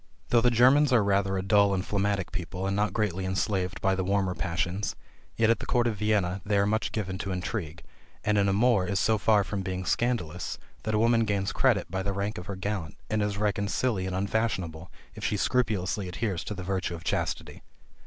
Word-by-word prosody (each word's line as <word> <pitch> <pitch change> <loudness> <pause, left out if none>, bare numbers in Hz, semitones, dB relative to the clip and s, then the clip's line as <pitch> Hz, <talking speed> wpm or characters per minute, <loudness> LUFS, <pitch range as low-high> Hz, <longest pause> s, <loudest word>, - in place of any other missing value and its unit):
Though 120 - +4
the 120 - +4
Germans 130 +5 +5
are 120 -4 +5
rather 100 -1 +1
a 95 - -2
dull 100 0 +4
and 95 - -2
phlegmatic 100 -2 -1
people, 90 +1 -4
and 95 0 0
not 105 +1 +1
greatly 95 -4 -1
enslaved 95 -1 -1
by 95 - +2
the 95 0 -1
warmer 95 -1 +1
passions, 85 +3 -2 0.4
yet 115 0 +4
at 115 - +1
the - - -7
court 120 -2 +2
of 115 -3 0
Vienna 100 -3 +1
they 105 0 +1
are 100 - +3
much 110 +2 0
given 95 -4 -3
to 100 - -3
intrigue: 90 -3 -4 0.4
and 105 -1 +2
an 100 0 +3
amour 105 -1 +3
is 100 +1 0
so 110 +2 +2
far 105 -1 +4
from 100 +1 -3
being 95 -1 -4
scandalous, 95 -8 -1 0.3
that 110 0 0
a - - +2
woman 115 0 +4
gains 100 -2 0
credit - - +2
by 95 +1 -1
the 100 +1 -2
rank 100 +2 -2
of 90 - -10
her 100 - -4
gallant, 95 -5 -4
and 110 0 +1
is 105 -1 -1
reckoned 100 -1 0
silly 105 -8 0
and 95 - -3
unfashionable 95 -5 -2 0.2
if - - -9
she 105 - 0
scrupulously 100 -5 0
adheres 95 -1 -2
to 105 - -4
the 95 - -6
virtue 95 -1 -2
of 85 - -10
chastity. - - -2
100 Hz, 215 wpm, -28 LUFS, 95-110 Hz, 0.4 s, Germans